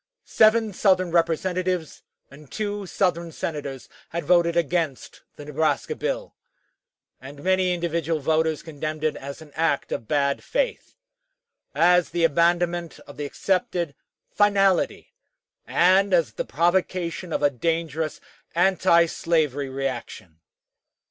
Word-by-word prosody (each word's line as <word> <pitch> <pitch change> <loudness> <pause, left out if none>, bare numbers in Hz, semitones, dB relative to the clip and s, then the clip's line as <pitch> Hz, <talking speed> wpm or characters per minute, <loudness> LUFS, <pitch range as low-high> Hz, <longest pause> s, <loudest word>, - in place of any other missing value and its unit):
Seven 220 -1 +3
Southern 185 -2 +2
Representatives 175 +1 0 0.3
and 140 0 -15
two 205 -2 -3
Southern 170 -3 -1
Senators 145 -5 -5 0.2
had 170 -2 -4
voted 170 0 +3
against 165 -4 -1
the 145 - -10
Nebraska 155 - -1
bill, - - -3 0.9
and 140 +2 -11
many 185 -1 +2
individual 170 -2 -1
voters 160 +1 0
condemned 155 -1 -5
it 155 - +1
as 140 +3 -8
an 150 - -17
act 160 -3 0
of 115 - -4
bad 140 0 0
faith - - -2 0.8
as 180 0 +4
the 170 - -1
abandonment 170 +1 +1
of 145 - -14
the 145 - -3
accepted 175 0 -1 0.4
"finality," 195 -3 +2 0.5
and 190 +2 +4
as 165 -4 +1
the - - -4
provocation 175 +1 -1
of 150 - -1
a 145 - +4
dangerous 160 +2 -2 0.4
antislavery 170 -5 +2
reaction. 130 -10 -5
170 Hz, 115 wpm, -24 LUFS, 150-185 Hz, 0.9 s, as